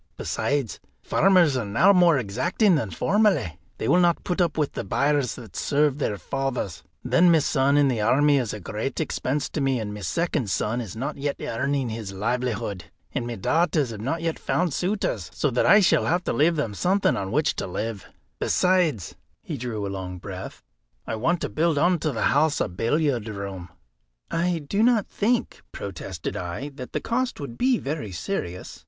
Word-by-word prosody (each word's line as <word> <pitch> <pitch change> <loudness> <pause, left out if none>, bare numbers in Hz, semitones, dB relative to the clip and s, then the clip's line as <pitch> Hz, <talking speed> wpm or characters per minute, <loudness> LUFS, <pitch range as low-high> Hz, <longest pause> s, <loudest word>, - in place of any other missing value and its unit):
Besides, 140 -6 -2 0.2
farmers 180 -7 +4
are 125 - 0
now 145 - +4
more 175 -5 +5
exacting 130 - +1
than 145 -10 0
formerly; 165 - +1 0.2
they - - -3
will 180 - +4
not 175 -1 +2
put 180 0 -1
up 170 -3 +1
with 150 -2 +1
the - - -4
byres 140 -2 +1
that 115 -6 -12
served 145 -1 +1
their 105 -7 -1
fathers. 135 - -3 0.2
Then 175 0 +4
my 165 - +6
son 140 -1 +2
in 145 -1 +5
the 120 -5 0
army 145 +6 +4
is 120 -5 -2
a 105 - -6
great 110 +7 -4
expense 145 -2 -1
to 150 - -3
me, 135 -2 +1
and 105 -2 -4
my 105 - -7
second 145 - -1
son 110 +6 -1
is 110 -5 -7
not 135 +7 -4
yet 140 0 -1
earning 135 +2 -1
his 110 -3 -5
livelihood, 105 -2 -2 0.3
and 120 - -3
my 120 - -4
daughters 150 - +1
have 105 -2 -7
not 165 +8 -2
yet 165 -1 -1
found 175 -4 0
suitors, 180 - -1
so 145 - 0
that 125 - +2
I 205 - +7
shall 185 - +3
have 175 +1 +1
to - - -1
leave 165 +4 +3
them 140 -9 -2
something 190 - +2
on 95 -1 -3
which 150 +4 +1
to - - -3
live; 105 +3 -4 0.3
besides" 175 - +1 0.3
he 155 - -5
drew 115 -5 -4
a - - -3
long 95 -2 -5
breath 95 +1 -8 0.4
"I 115 - -3
want 165 +10 0
to - - -1
build 160 -1 +1
on 175 +3 +3
to 155 - -1
the 110 -4 -2
house 145 +1 +2
a - - +1
billiard 120 - 0
room." 100 -3 -6 0.6
"I 170 -2 0
do 200 +7 0
not 230 -3 +4
think," 235 +3 -1
protested 95 -3 -6
I, 90 +11 -4
"that 130 -3 -10
the - - -1
cost 255 +2 -1
would 140 -5 -6
be 255 - +2
very 145 - -4
serious." 90 - -5
140 Hz, 195 wpm, -25 LUFS, 110-165 Hz, 0.6 s, I